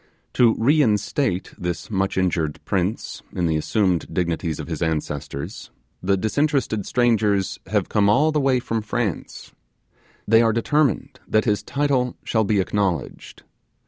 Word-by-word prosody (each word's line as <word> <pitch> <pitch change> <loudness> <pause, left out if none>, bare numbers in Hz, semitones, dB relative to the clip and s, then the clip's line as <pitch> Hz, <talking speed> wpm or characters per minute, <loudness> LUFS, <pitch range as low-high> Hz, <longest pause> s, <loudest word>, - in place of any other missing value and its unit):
To 120 -3 +4
reinstate 115 - +1
this 90 +3 -4
much 95 -1 -1
injured 85 -5 0
prince 95 +2 -2
in 90 - -1
the 80 -1 +1
assumed 90 +2 0
dignities 85 -2 -2
of - - -4
his 80 -3 -5
ancestors, 75 -3 -3 0.3
the 95 +1 +1
disinterested 115 -1 0
strangers 110 -5 +1
have - - 0
come 100 -1 +2
all 145 +9 +4
the 150 -1 +1
way 135 -2 +2
from 115 -2 -2
France: 110 -3 -4 0.8
they 115 +2 +6
are 115 -1 +3
determined 140 +2 0
that 110 - +2
his 105 -3 +1
title 140 -3 0
shall 110 -1 +1
be 105 0 +1
acknowledged. 95 -2 -2
105 Hz, 140 wpm, -22 LUFS, 90-120 Hz, 0.8 s, they